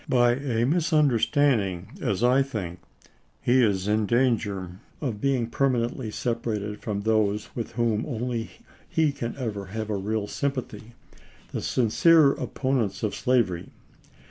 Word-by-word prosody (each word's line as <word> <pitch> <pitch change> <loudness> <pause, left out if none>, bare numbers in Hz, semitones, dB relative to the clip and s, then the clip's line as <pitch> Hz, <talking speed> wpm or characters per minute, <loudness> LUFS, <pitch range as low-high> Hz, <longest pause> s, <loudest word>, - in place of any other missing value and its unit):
By 120 -1 +4
a 120 -3 0
misunderstand 145 - +3
ing, 90 -2 -5
as 100 +3 -1
I 125 +2 +5
think, 100 -10 -4 0.6
he 125 +1 +3
is 100 -4 +1
in 105 0 +1
danger 105 -7 0 0.2
of 115 -8 -3
being 135 -4 +1
permanently 120 -1 0
sep 115 +2 -2
arated 105 -2 -3
from 100 -2 -3
those 105 -1 0
with 115 -1 -4
whom 115 -2 0
only 120 -2 -3 0.4
he 160 -2 +2
can 120 -4 -5
ever 105 -7 -4
have 110 +2 -4
a - - 0
real 105 +2 -2
sympathy 120 -3 -4 0.3
— - - -26
the - - -2
sincere 140 +5 +4
opponents 130 -9 -2
of 105 - 0
slavery. 115 -9 0
115 Hz, 145 wpm, -26 LUFS, 105-130 Hz, 0.6 s, I